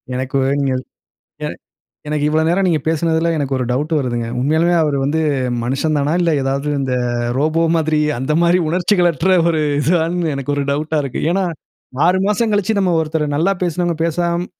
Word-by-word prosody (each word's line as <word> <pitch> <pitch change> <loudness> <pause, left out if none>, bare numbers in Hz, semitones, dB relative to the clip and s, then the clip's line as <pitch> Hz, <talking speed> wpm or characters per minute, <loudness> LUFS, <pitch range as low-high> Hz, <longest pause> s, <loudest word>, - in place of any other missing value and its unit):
எனக்கு 130 +1 -4
வ் 130 - +1
ங்க 135 -1 0 0.7
எ - - -1 0.6
எனக்கு 150 -1 -1
இவ்ளோ 155 +1 +2
நேரம் 190 +3 +2
நீங்க 165 -4 +1
பேசினதில 165 +1 +1
எனக்கு 140 -2 -1
ஒரு 125 - -1
டவுட் 145 +6 -1
வருதுங்க. 120 -3 -2
உண்மையாலுமே 160 +6 +2
அவர் 150 -2 0
வந்து 155 +3 0 0.4
மனுஷன் 140 +5 0
தானா 145 +2 0
இல்ல 170 - +2
ஏதாவது, 135 +2 -1
இந்த 135 -2 -2 0.5
ரோபோ 155 +3 +1
மாதிரி 155 -1 +1 0.2
அந்த 130 +4 -2
மாதிரி 175 +1 +4
உணர்ச்சிகளற்ற 175 0 +1 0.2
ஒரு 160 -2 +1 0.2
இதுவான்னு 165 +1 +1
எனக்கு 140 +1 -3
ஒரு 140 - 0
டவுட்டா 155 +2 -1
இருக்கு. 135 -3 -4
ஏன்னா 195 - +1 0.6
6 185 +1 +3
மாசம் 215 +2 +1
கழிச்சு 205 +1 +1
நம்ம 185 -3 +2
ஒருத்தர, 155 -1 -1
நல்லா 175 +6 +2
பேசினவங்க 175 -1 -1
பேசாம 170 +1 -1
160 Hz, 170 wpm, -18 LUFS, 145-175 Hz, 0.7 s, மாதிரி